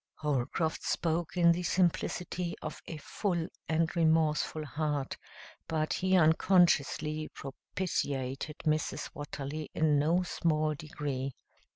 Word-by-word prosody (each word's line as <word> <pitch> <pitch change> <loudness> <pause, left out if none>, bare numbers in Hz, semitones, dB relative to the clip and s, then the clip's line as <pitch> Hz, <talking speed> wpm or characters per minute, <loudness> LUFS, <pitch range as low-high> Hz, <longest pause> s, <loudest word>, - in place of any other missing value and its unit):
Holcroft 150 +2 -1
spoke 170 +2 -1
in 170 -1 +6
the 170 +1 0
simplicity 175 0 0
of - - -5
a 160 - -5
full 170 +1 -2 0.2
and 165 +1 +1
remorseful 160 -1 +2
heart, 145 -2 -2 0.5
but 155 -1 0
he 185 0 +3
unconsciously 155 -2 +3
propitiated 140 -1 -3
Mrs. 155 -1 0
Watterly 145 +1 -5
in 150 -2 +3
no 165 +5 +3
small 155 -3 +1
degree. 145 -3 -4
155 Hz, 105 wpm, -31 LUFS, 150-170 Hz, 0.5 s, in